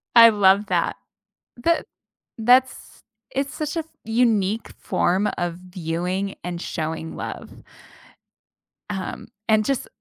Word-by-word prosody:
I 230 0 +11
love 200 -1 +4
that. - - +1 0.6
That 335 +7 +1 0.5
that's 255 +3 +3 0.3
it's 275 +1 -2
such 305 +1 -3
a 330 - +1
f 320 - -4 0.2
unique 225 -2 +1
form 190 +4 +1
of 175 -1 -1
viewing 180 +2 -3
and 175 0 -4
showing 160 0 -4
love. - - -6 1.4
Um, 195 -3 -5 0.2
and 215 -1 +4
just 275 -3 -1
205 Hz, 115 wpm, -23 LUFS, 180-240 Hz, 1.4 s, I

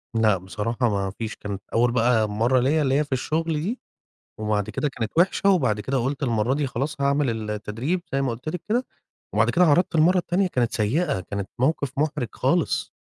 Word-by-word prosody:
لأ، 110 -3 +3
بصراحة 110 +6 -2
ما 100 -2 -1
فيش 110 -1 -4
كانت 100 -1 -6
أول 120 +1 +3
بقى 115 -2 +2
مرّه 115 +5 +2
ليّا 150 +5 +2
اللي 135 -1 +2
هي - - +2
في 145 - -15
الشغل 160 +5 -1
دي، 225 +9 -3 0.6
وبعد 105 -2 -1
كده 150 - -1
كانت 115 -5 -4
وحشة، 190 +2 +3
وبعد 130 - +2
كده 135 +6 -1
قُلت 135 +4 -2
المرّه 120 0 +1
دي 145 -1 0
خلاص 140 +4 -3
هاعمل 140 0 +2
ال 110 -2 -3
التدريب 115 - -2
زي 135 - +1
ما 135 - 0
قُلت 125 +7 -5
لِك 175 +1 -4
كده، 245 +4 +1 0.5
وبعد - - +3
كده 180 0 +4
عرضت 170 +3 +3
المرّه 170 +4 +4
التانية 180 +2 +1
كانت 120 -8 0
سيئة، 140 - 0
كانت 100 +1 -5
موقف 140 0 +1
محرج 150 -5 0
خالص. - - 0
130 Hz, 200 wpm, -24 LUFS, 110-155 Hz, 0.6 s, كده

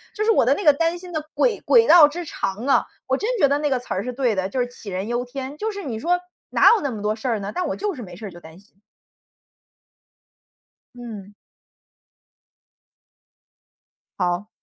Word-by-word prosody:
就 425 - -1
是 450 - +4
我 - - +4
的 270 - +4
那 410 - -5
个 295 -4 +7
担 330 +3 0
心 360 0 -11
的 310 -1 -2
轨 485 -3 +2
轨 460 -1 +6
道 325 -4 +9
之 345 +4 -6
长 210 -4 -4
啊， - - +3 0.2
我 - - +2
真 435 - -2
觉 285 - +5
得 285 +1 +1
那 295 - 0
个 265 - +1
词 245 - -6
儿 190 - -2
是 250 - -4
对 245 -2 +1
的， 190 0 -1
就 255 - -3
是 245 - +2
“杞 225 -4 -10
人 190 +3 -3
忧 240 +1 -1
天”， 265 +2 -6
就 440 - -1
是 400 -1 -7
你 230 -7 -4
说， 350 +8 +1 0.3
哪 - - +6
有 440 - -1
那 280 - -1
么 215 -3 -6
多 215 +1 0
事 235 - -6
儿 230 -3 0
呢， 200 +1 -5
但 360 -3 -2
我 - - -2
就 415 -2 -2
是 250 - -8
没 180 -2 -10
事 215 - -9
儿 195 - -9
就 175 - -12
担 160 +1 -14
心。 200 0 -27 2.1
嗯。 215 -5 -9 2.9
好。 180 +2 -1
250 Hz, 230 characters per minute, -22 LUFS, 205-330 Hz, 2.9 s, 道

